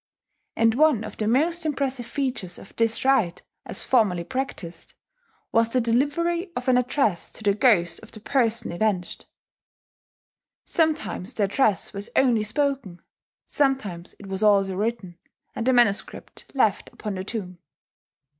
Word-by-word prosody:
And 225 0 +3
one 285 -4 +3
of 215 - -8
the 215 - -1
most 325 +9 +2
impressive 270 -5 -2
features 250 -10 -3
of - - -14
this 230 +2 0
rite, 225 -11 +2 0.2
as - - -3
formerly 205 -9 +2
practised, 225 -7 -6 0.6
was 230 0 +3
the 255 - +1
delivery 335 - 0
of 245 - -4
an 255 - +4
address 250 - +1
to - - -8
the 200 -1 +3
ghost 205 -6 +3
of 220 - -14
the 215 - -10
person 230 -1 0
avenged. 185 -1 -2 1.4
Sometimes 310 - 0
the 210 - +1
address 205 -1 +2
was 200 +3 -6
only 245 -5 +3
spoken; 220 - -2 0.4
sometimes 220 - -1
it 205 - -12
was 195 0 -4
also 200 -3 +3
written, 200 -4 -3 0.4
and 230 - -3
the - - +5
manuscript 235 -5 0
left - - +1
upon 210 -2 -5
the 185 -1 -4
tomb. 190 -4 -6
230 Hz, 145 wpm, -24 LUFS, 195-265 Hz, 1.4 s, the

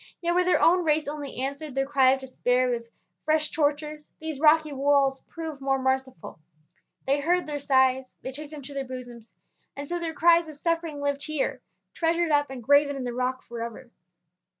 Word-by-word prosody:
Yet 345 0 0
where 360 +1 +3
their 360 - +3
own 355 +1 +4
race 305 -2 +1
only 290 -2 -5
answered 280 +1 -4
their 270 0 +1
cry 270 -2 +4
of 265 +1 +3
despair 255 -1 0
with 235 -1 -4 0.3
fresh 310 -1 +1
tortures 300 0 -1
these 315 -3 -5
rocky 310 0 +4
walls 275 -1 +2
proved 320 -4 -7
more 270 0 +1
merciful; 260 -9 -2 0.7
they 275 +2 +2
heard 350 +5 +1
their 295 -1 -4
sighs, 260 -1 +2
they 260 - -4
took 290 +2 -8
them 300 -2 -9
to 285 +2 -8
their 275 -1 -2
bosoms, 245 -3 -9 0.4
and 285 0 -5
so 350 +2 -2
their 330 -2 -4
cries 335 0 +4
of 305 - -9
suffering 330 -2 -2
lived 285 0 -1
here, 310 -2 -2 0.3
treasured 335 0 +1
up 290 -1 +2
and 260 -3 -8
graven 285 +3 +4
in 270 - -4
the 245 -1 -3
rock 255 +1 -2
forever. 235 +1 -7
285 Hz, 190 wpm, -26 LUFS, 265-310 Hz, 0.7 s, own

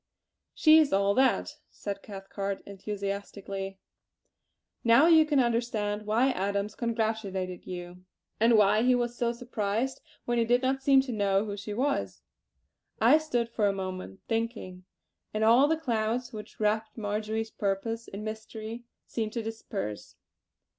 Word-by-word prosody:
"She 315 0 +7
is 305 -3 +3
all 200 +1 +3
that!" 260 +4 +2
said 200 -1 -6
Cathcart 195 -1 -5
enthusiastically. 200 -1 -5 1.1
"Now 235 +5 +6
you 320 -2 +6
can 295 -3 +3
understand 225 -4 0
why 235 +5 +3
Adams 200 -1 -1
congratulated 220 -6 -2
you; 180 0 -7 0.4
and 230 +1 +5
why 210 +1 +5
he 250 +1 +4
was 240 -1 -1
so 235 -1 0
surprised 235 +1 -2 0.2
when 240 0 +1
you 230 - +3
did 245 +2 +3
not 265 +1 +1
seem 270 0 +5
to 265 -1 -5
know 200 -2 +1
who 205 -1 -4
she 205 +1 -6
was." 275 +4 -1 0.8
I 310 - +6
stood 245 -7 -1
for 220 -3 0
a 200 - +1
moment 185 - -6
thinking, 225 -5 -3 0.5
and 215 - +1
all 240 +6 +6
the 320 +1 +2
clouds 235 -4 -1
which 210 -1 -9
wrapped 215 +1 0
Marjory's 220 +1 -2
purpose 225 +3 -2
in 200 +2 -7
mystery 220 +1 -6 0.2
seemed 220 -2 -3
to 230 - -2
disperse. 210 - -5
220 Hz, 145 wpm, -29 LUFS, 200-240 Hz, 1.1 s, She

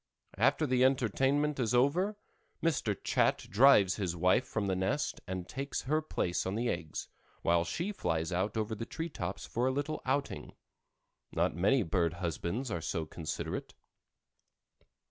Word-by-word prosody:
After 135 +7 +3
the 130 -2 +3
entertainment 135 +3 +2
is 120 -1 +1
over, 175 +12 +2 0.5
Mr. 130 - +1
Chat - - +2
drives 100 -4 +6
his 90 -5 -2
wife 90 +8 +3
from 105 -2 -2
the 95 -1 0
nest 95 +11 -1
and 95 -1 -4
takes 135 +1 -4
her 155 +4 +1
place 90 - -1
on 95 - -2
the 120 +2 0
eggs 85 -5 -4 0.4
while 85 0 +3
she 170 - -2
flies 80 - -1
out 95 +5 -1
over 110 0 -1
the 115 +2 -5
tree 165 +1 -4
tops 95 - -5
for 120 +2 0
a - - +2
little 145 +3 -2
outing. 140 +2 -2 0.8
Not - - +1
many 100 - +3
bird 85 -1 +1
husbands 90 - -3
are 85 - -2
so 80 0 -2
considerate. 80 0 -5
110 Hz, 155 wpm, -32 LUFS, 90-135 Hz, 0.8 s, drives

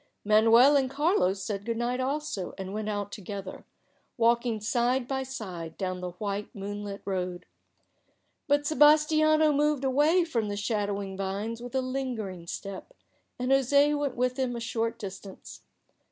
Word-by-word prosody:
Manuel 225 +6 +6
and 265 -2 +2
Carlos 275 - +1
said 200 +1 -3
good 230 +1 -2
night 245 +2 -1
also, 270 -7 -3
and 190 0 -6
went 215 0 -3
out 205 -1 -3
together, 195 -2 -7 0.5
walking 235 -1 +2
side 240 +3 0
by 265 0 -1
side 190 -11 -7
down 185 -1 -3
the 180 -1 -5
white 200 +2 -4
moonlit 205 0 -6
road; 180 -2 -3 1.0
but 290 0 +3
Sebas 300 +1 +5
tiano 310 -1 +3
moved 295 -1 +1
away 295 +7 +3
from 230 -10 -1
the 205 - -3
shadowing 205 -2 -2
vines 200 +4 -3
with 245 +1 -8
a 260 - +2
lingering 240 -9 -4
step, 200 - -7 0.4
and 250 +1 -1
José 280 +2 +4
went 285 -3 -2
with 250 +1 -1
him 250 -2 0
a - - -4
short 230 0 -2
distance. 195 -2 -9
230 Hz, 155 wpm, -28 LUFS, 200-270 Hz, 1.0 s, Manuel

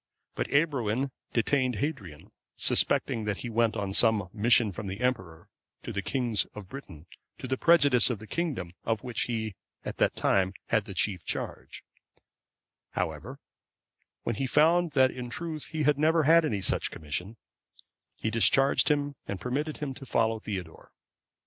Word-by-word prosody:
But - - -2
Ebroin 135 -4 +1 0.2
detained 125 +1 +1
Hadrian, 105 - -5 0.2
suspecting 110 -2 +2
that 105 -2 -2
he 120 - -5
went 115 0 +2
on 100 -1 -2
some 105 -4 +3
mission 115 0 +3
from 105 +2 -6
the 95 +2 -5
Emperor 95 -11 -2 0.4
to - - -5
the 100 - -1
kings 110 +2 0
of 105 -3 -8
Britain, 95 - -10 0.3
to - - -6
the 130 - 0
prejudice 145 -6 +5
of 120 - -1
the 110 - -11
kingdom 115 - -3
of 115 -2 -1
which 125 -2 -2
he 110 -3 -3 0.3
at - - -5
that - - +2
time 95 0 +2
had - - +2
the - - -7
chief 95 -5 +1
charge; - - -5 1.1
however, - - -3 0.9
when 115 - -1
he 135 - -1
found 165 +4 +3
that 130 -2 +4
in 125 -1 -6
truth 155 +2 -5
he 155 -1 -2
had 145 0 +3
never 160 +1 +3
had 165 +2 +6
any 105 -9 -1
such - - 0
commission, 90 +9 -5 0.8
he 110 - -3
discharged 120 - +4
him, 145 -1 +1
and 100 - -4
permitted 145 +5 -2
him 145 -3 -4
to 135 - -10
follow 115 -1 +1
Theodore. 95 -7 -7
120 Hz, 160 wpm, -28 LUFS, 105-140 Hz, 1.1 s, had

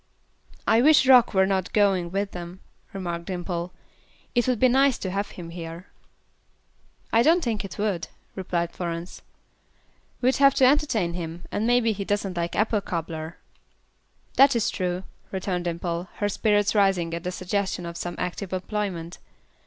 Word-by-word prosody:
"I 225 +1 +5
wish 295 0 +6
Rock 250 -4 +6
were 190 0 +5
not 190 -2 -1
going 195 -4 +2
with 195 +2 -2
them," 175 +1 -8 0.3
remarked 175 -3 -4
Dimple. 175 -1 -4 0.6
"It 240 0 +2
would 250 -2 +2
be 255 - +6
nice 265 +1 +4
to 190 - -4
have 200 +2 -2
him 170 -2 -7
here." 165 +1 -8 1.2
"I 225 - +6
don't 330 +7 +4
think 225 -4 -1
it 195 - -8
would," 205 -5 -1 0.3
replied 175 -3 -2
Florence; 170 0 -5 1.0
"we'd 255 +1 +2
have 275 -1 +5
to 260 - +5
entertain 255 - +2
him, 170 0 -6
and 215 +2 -1
maybe 240 -2 +3
he 205 -1 -3
doesn't 200 -2 -2
like 170 0 -2
'apple 215 0 +1
cobbler.'" 165 -3 -5 1.0
"That 275 -1 +7
is 230 -1 +1
true," 180 -1 -2 0.3
returned 185 -2 -2
Dimple, 170 +1 -3
her 205 - -1
spirits 205 0 +2
rising 190 -5 +2
at 170 0 -4
the 180 - -2
suggestion 185 0 -2
of 170 0 -6
some 175 +1 -4
active 180 +1 -4
employment. 185 -3 -3
190 Hz, 160 wpm, -25 LUFS, 175-215 Hz, 1.2 s, That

